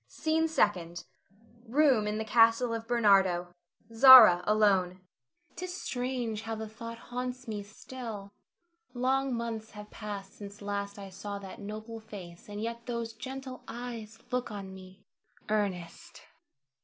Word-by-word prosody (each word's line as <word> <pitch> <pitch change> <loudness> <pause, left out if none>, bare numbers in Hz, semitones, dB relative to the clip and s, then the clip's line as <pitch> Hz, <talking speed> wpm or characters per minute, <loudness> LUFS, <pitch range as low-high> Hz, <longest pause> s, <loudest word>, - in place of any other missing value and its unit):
SCENE 320 +1 0
SECOND. 180 - 0 0.6
[Room 260 -4 +3
in 210 0 -1
the 220 - -3
castle 230 +1 +4
of 225 0 -5
Bernardo. 195 -7 +3 0.4
Zara 225 -7 +10
alone]. 200 -4 +3
Zara. 185 - -22 0.6
'Tis 365 +1 -5
strange 245 -4 -3
how 225 +1 -4
the 220 0 -5
thought 230 +2 -8
haunts 250 +1 -6
me 210 -2 -4
still. 210 -1 -9 0.6
Long 265 +2 +1
months 230 -2 -4
have 210 0 -10
passed 200 -2 -7
since 200 0 -10
last 200 0 -4
I 195 -1 -9
saw 200 +2 -6
that 195 -1 -10
noble 215 +2 -7
face, 185 -5 -11
and 205 0 -6
yet 230 +2 -5
those 235 -2 -3
gentle 260 +2 -7
eyes 230 -2 -7
look 250 0 -1
on 195 -3 -7
me! 190 +1 -14 0.4
Ernest! 195 -6 -3
220 Hz, 140 wpm, -30 LUFS, 200-245 Hz, 0.6 s, Zara